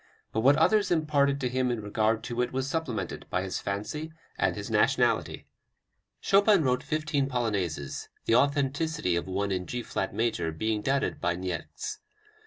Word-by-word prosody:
But -, -, 0 dB
what 135 Hz, +5 st, +6 dB
others 200 Hz, +6 st, +3 dB
imparted 145 Hz, -4 st, +2 dB
to 125 Hz, -, +1 dB
him 130 Hz, 0 st, 0 dB
in 120 Hz, -2 st, -1 dB
regard 110 Hz, +1 st, 0 dB
to 120 Hz, +1 st, -2 dB
it 125 Hz, -, -1 dB
was 130 Hz, +1 st, -2 dB
supplemented 145 Hz, -6 st, -3 dB
by 90 Hz, -, 0 dB
his 95 Hz, -1 st, -3 dB
fancy 130 Hz, +11 st, -4 dB, 0.2 s
and -, -, +1 dB
his -, -, -6 dB
nationality." -, -, +2 dB, 0.7 s
Chopin 200 Hz, -3 st, +4 dB
wrote 125 Hz, -2 st, +1 dB
fifteen 150 Hz, -3 st, -1 dB
Polonaises, 100 Hz, -, -2 dB, 0.2 s
the -, -, +2 dB
authenticity 140 Hz, -, +2 dB
of 85 Hz, -, -2 dB
one 100 Hz, +2 st, -1 dB
in 90 Hz, -1 st, -2 dB
G 125 Hz, -1 st, -3 dB
flat -, -, -2 dB
major 110 Hz, -8 st, 0 dB
being 110 Hz, +6 st, -1 dB
doubted 135 Hz, +4 st, 0 dB
by 85 Hz, -1 st, +1 dB
Niecks. 90 Hz, -1 st, -5 dB
125 Hz, 165 wpm, -28 LUFS, 100-145 Hz, 0.7 s, what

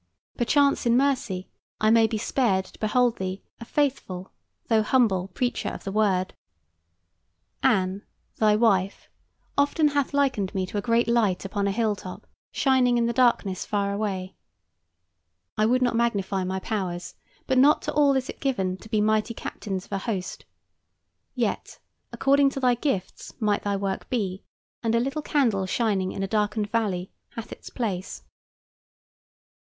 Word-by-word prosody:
Perchance 280 Hz, +2 st, +2 dB
in 235 Hz, +1 st, +4 dB
mercy 245 Hz, -9 st, 0 dB, 0.3 s
I 215 Hz, 0 st, +3 dB
may 225 Hz, -1 st, +5 dB
be 220 Hz, -, -2 dB
spared 210 Hz, -4 st, +1 dB
to -, -, -17 dB
behold 240 Hz, +2 st, +2 dB
thee 190 Hz, 0 st, -4 dB, 0.2 s
a 230 Hz, -, -8 dB
faithful 230 Hz, -11 st, -2 dB, 0.4 s
though 225 Hz, -2 st, +3 dB
humble 215 Hz, -6 st, +2 dB
preacher 245 Hz, +6 st, -2 dB
of -, -, -8 dB
the 195 Hz, -, -4 dB
Word. 195 Hz, -3 st, +1 dB, 1.3 s
Anne, 190 Hz, +1 st, +2 dB, 0.4 s
thy 215 Hz, -1 st, +4 dB
wife, 200 Hz, -4 st, +1 dB, 0.5 s
often 295 Hz, +2 st, +3 dB
hath 285 Hz, -2 st, 0 dB
likened 260 Hz, -10 st, 0 dB
me 190 Hz, -1 st, 0 dB
to 195 Hz, +3 st, -3 dB
a -, -, -3 dB
great 230 Hz, +2 st, +2 dB
light 220 Hz, -6 st, +1 dB
upon 200 Hz, 0 st, -1 dB
a -, -, +1 dB
high -, -, -5 dB
hill 220 Hz, -2 st, +1 dB
top, 185 Hz, -2 st, -9 dB, 0.3 s
shining 255 Hz, -3 st, +3 dB
in 235 Hz, -, +2 dB
the 235 Hz, -, 0 dB
darkness 235 Hz, -6 st, +2 dB
far 200 Hz, -1 st, -1 dB
away. 195 Hz, -3 st, -3 dB, 1.2 s
I 215 Hz, 0 st, +2 dB
would 255 Hz, +2 st, +2 dB
not 245 Hz, -2 st, +1 dB
magnify 200 Hz, -5 st, 0 dB
my 190 Hz, +1 st, -2 dB
powers, 185 Hz, -4 st, -4 dB, 0.3 s
but 260 Hz, -1 st, +2 dB
not 290 Hz, +3 st, +5 dB
to -, -, -3 dB
all 285 Hz, -2 st, +4 dB
is 260 Hz, -1 st, 0 dB
it -, -, -8 dB
given 190 Hz, -9 st, -1 dB
to 220 Hz, -, -14 dB
be 215 Hz, -1 st, +1 dB
mighty 215 Hz, +2 st, +1 dB
captains 195 Hz, -3 st, -5 dB
of -, -, -25 dB
a 195 Hz, -, -1 dB
host. 190 Hz, -4 st, -4 dB, 0.9 s
Yet, -, -, -2 dB, 0.3 s
according 275 Hz, 0 st, +3 dB
to 270 Hz, -, -5 dB
thy 250 Hz, -2 st, +3 dB
gifts 235 Hz, -7 st, -3 dB
might 210 Hz, -3 st, +1 dB
thy 205 Hz, -1 st, -1 dB
work 195 Hz, -1 st, -3 dB
be, 195 Hz, -6 st, -2 dB, 0.4 s
and 230 Hz, -1 st, +1 dB
a -, -, +4 dB
little 275 Hz, +5 st, -2 dB
candle 230 Hz, -11 st, +1 dB
shining 195 Hz, -3 st, 0 dB
in 195 Hz, -, -4 dB
a -, -, -1 dB
darkened 210 Hz, 0 st, -1 dB
valley 195 Hz, -6 st, -1 dB, 0.2 s
hath 230 Hz, 0 st, -7 dB
its -, -, -9 dB
place. 200 Hz, -7 st, -4 dB
215 Hz, 165 wpm, -25 LUFS, 195-245 Hz, 1.3 s, may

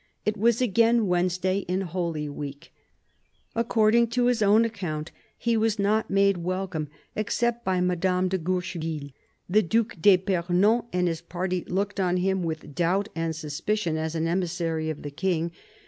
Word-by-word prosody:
It 210 Hz, -, +1 dB
was 230 Hz, +3 st, +2 dB
again 230 Hz, 0 st, +3 dB
Wednes 180 Hz, -1 st, +1 dB
day 185 Hz, +1 st, +1 dB
in 185 Hz, 0 st, -2 dB
Holy 170 Hz, -4 st, -3 dB
Week. 145 Hz, -1 st, -7 dB, 0.8 s
According 230 Hz, 0 st, +3 dB
to 245 Hz, -, +4 dB
his 245 Hz, -2 st, +2 dB
own 210 Hz, +3 st, +5 dB
account 170 Hz, -8 st, -4 dB, 0.3 s
he 235 Hz, 0 st, 0 dB
was 220 Hz, -1 st, +1 dB
not 210 Hz, +2 st, +1 dB
made 195 Hz, -1 st, +3 dB
welcome, 180 Hz, -3 st, -3 dB, 0.3 s
except 235 Hz, +2 st, 0 dB
by 185 Hz, -3 st, +1 dB
Madame 180 Hz, +1 st, +1 dB
de 190 Hz, 0 st, -1 dB
Guercheville. 165 Hz, -4 st, -3 dB, 0.4 s
The 210 Hz, +4 st, +4 dB
Due 225 Hz, +5 st, +2 dB
d'lipernon 190 Hz, +3 st, +2 dB
and 180 Hz, 0 st, +1 dB
his 165 Hz, -1 st, -2 dB
party 180 Hz, +1 st, -3 dB
looked 200 Hz, +2 st, -2 dB
on 180 Hz, -1 st, +2 dB
him 190 Hz, +1 st, +1 dB
with 155 Hz, -3 st, -4 dB
doubt 185 Hz, +6 st, +1 dB
and 165 Hz, -1 st, -2 dB
suspicion 160 Hz, +4 st, -2 dB
as 160 Hz, +1 st, -2 dB
an 165 Hz, 0 st, 0 dB
emissary 165 Hz, -2 st, -1 dB
of 155 Hz, -, -5 dB
the 145 Hz, -, -5 dB
King. 170 Hz, +1 st, -1 dB
185 Hz, 160 wpm, -26 LUFS, 165-205 Hz, 0.8 s, own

